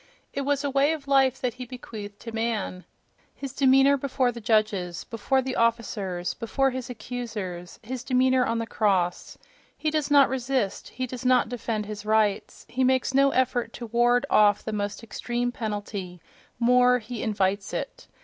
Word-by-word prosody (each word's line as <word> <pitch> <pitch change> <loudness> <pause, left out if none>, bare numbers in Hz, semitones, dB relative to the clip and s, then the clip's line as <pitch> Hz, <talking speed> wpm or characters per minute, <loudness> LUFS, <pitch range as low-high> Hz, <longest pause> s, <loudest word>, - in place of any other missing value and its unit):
It 280 - -2
was 280 0 0
a 285 - 0
way 280 +3 +3
of 290 -3 -7
life 270 -2 +3
that 250 -2 -1
he 250 0 -7
bequeathed 215 -5 -9
to 230 - -7
man: 225 -5 -2 0.5
his 275 -2 -7
demeanour 270 +1 +5
before 260 -2 0
the 235 0 -9
judges, 210 -6 0
before 260 +4 0
the 260 0 -3
officers, 205 -6 -1
before 270 +3 0
his 255 -1 -5
accusers—his 225 -1 -6
demeanour 255 0 +3
on 230 - 0
the 230 - -2
cross. 190 -6 0 0.4
He 310 - -1
does 300 -2 0
not 285 -2 +6
resist; 255 -5 -2
he 255 - -4
does 250 -1 -7
not 250 -2 +3
defend 230 -3 -3
his 210 0 -7
rights; 215 -1 0
he 260 +1 -1
makes 260 0 +2
no 275 +1 +5
effort 255 -2 0
to 240 - -7
ward 240 +3 +2
off 205 -1 +5
the 220 - -3
most 205 +1 -3
extreme 240 +2 -2
penalty—more, 220 +4 0
he 235 -1 -6
invites 200 -3 0
it.... - - -5
240 Hz, 165 wpm, -26 LUFS, 210-260 Hz, 0.5 s, not